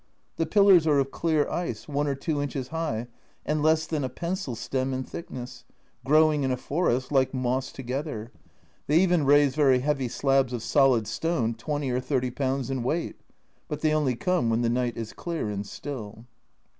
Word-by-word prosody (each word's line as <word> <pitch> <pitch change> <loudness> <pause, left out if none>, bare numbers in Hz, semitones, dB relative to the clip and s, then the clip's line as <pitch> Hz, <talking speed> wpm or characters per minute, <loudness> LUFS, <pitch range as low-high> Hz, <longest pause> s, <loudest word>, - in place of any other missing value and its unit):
The 165 - 0
pillars 195 -3 +5
are 150 -2 +4
of 135 0 +1
clear 160 -3 +1
ice, 175 0 -3
i 150 - -9
or 145 0 0
2 145 +1 -2
inches 135 -3 -4
high, 160 -9 -2 0.4
and 150 0 0
less 160 +1 +3
than 155 -3 -2
a 130 - -2
pencil 170 - -4
stem 130 +2 -2
in 130 - -2
thickness, 130 -4 -8 0.4
growing 155 +1 +4
in 130 - 0
a 125 - 0
forest 130 -4 -1
like 135 -1 +2
moss 130 +1 -1
together. 130 -3 -5 0.6
They 150 - +4
even 175 -5 +3
raise 145 -1 +5
very 135 -4 +4
heavy 135 -2 0
slabs 135 0 +1
of 120 -2 -3
solid 130 -4 +3
stone 125 -5 -1
20 145 +3 -3
or 125 - 0
30 130 -1 -1
pounds 135 0 -2
in 130 -2 -2
weight, 155 +8 -2 0.5
but 150 - -5
they 155 -1 +2
only 145 -5 +1
come 180 -3 0
when 115 +1 +1
the 115 - +2
night 120 -1 -1
is 115 -2 -5
clear 165 -10 -4
and 100 0 -4
still. 115 -5 -7
135 Hz, 185 wpm, -26 LUFS, 125-155 Hz, 0.6 s, pillars